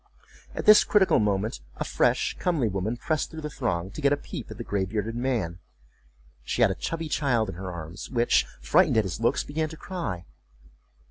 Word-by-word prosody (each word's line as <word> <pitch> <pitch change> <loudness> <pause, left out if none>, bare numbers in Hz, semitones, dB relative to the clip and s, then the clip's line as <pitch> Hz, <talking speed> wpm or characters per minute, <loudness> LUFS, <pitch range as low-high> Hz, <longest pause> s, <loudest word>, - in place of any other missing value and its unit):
At - - -4
this 215 0 +9
critical 200 -3 +4
moment 105 +1 0
a - - -3
fresh - - +1
comely 160 -10 +1
woman 100 +4 -2
pressed 155 +4 -1
through 160 -1 -8
the 150 -1 -5
throng 95 -9 -2
to 155 - -7
get 140 -1 +3
a 145 - +3
peep 145 - -8
at 110 - -8
the 120 - -5
gray 100 -3 -1
bearded 105 +4 -3
man. 115 -9 -1 0.8
She - - +1
had - - +5
a - - 0
chubby 165 -1 -4
child 125 -8 +1
in - - -4
her 95 +1 -5
arms, 85 +1 -7
which, 120 -2 +2
frightened - - +4
at 110 - +5
his 95 0 -4
looks, 115 - +1
began 155 +2 -2
to 160 - -10
cry. 160 - -5
115 Hz, 200 wpm, -26 LUFS, 95-150 Hz, 0.8 s, this